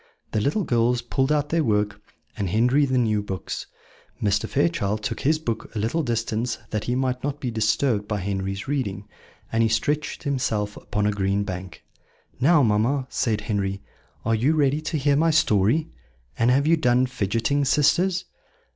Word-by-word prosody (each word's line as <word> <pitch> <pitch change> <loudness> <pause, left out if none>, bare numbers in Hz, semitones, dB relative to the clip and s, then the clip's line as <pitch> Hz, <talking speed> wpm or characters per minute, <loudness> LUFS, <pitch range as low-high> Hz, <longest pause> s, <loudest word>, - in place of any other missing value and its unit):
The 110 - 0
little 150 - +1
girls 120 -2 +1
pulled 135 +3 0
out 145 -1 +1
their 165 0 +1
work, 105 -2 0 0.3
and 100 -4 -2
Henry 125 +8 +3
the 130 -1 +1
new 110 -4 +2
books. 95 -2 -5 0.5
Mr. 100 -1 0
Fairchild 100 +5 0
took - - -3
his 155 +3 +2
book 115 -8 -4
to 110 - -7
a - - 0
little 115 +11 0
distance, 115 -2 -1
that 105 -1 -2
he 120 - 0
might 130 -1 -1
not 145 0 -2
be 125 - -3
disturbed 110 0 +1
by 105 - -1
Henry's 95 +1 -3
reading, 105 -8 -2 0.4
and 115 - +1
he 115 - +3
stretched 145 +9 -1
himself 110 -8 -1
upon 105 0 -2
a 105 - +2
green 100 0 0
bank. 90 -4 -7 0.6
"Now, 150 +3 +5
mamma," 120 +5 +2
said 110 -3 0
Henry, 100 -2 -2 0.4
"are 115 - +2
you 130 +8 +2
ready 145 0 +2
to 155 +1 -2
hear 140 0 +2
my 165 +3 +3
story? 150 +1 +2 0.4
And 115 - +2
have 135 +3 +3
you 165 +2 +4
done 125 -4 +3
fidgeting, 120 +4 0
sisters?" 175 +7 +2
115 Hz, 175 wpm, -24 LUFS, 105-140 Hz, 0.6 s, Now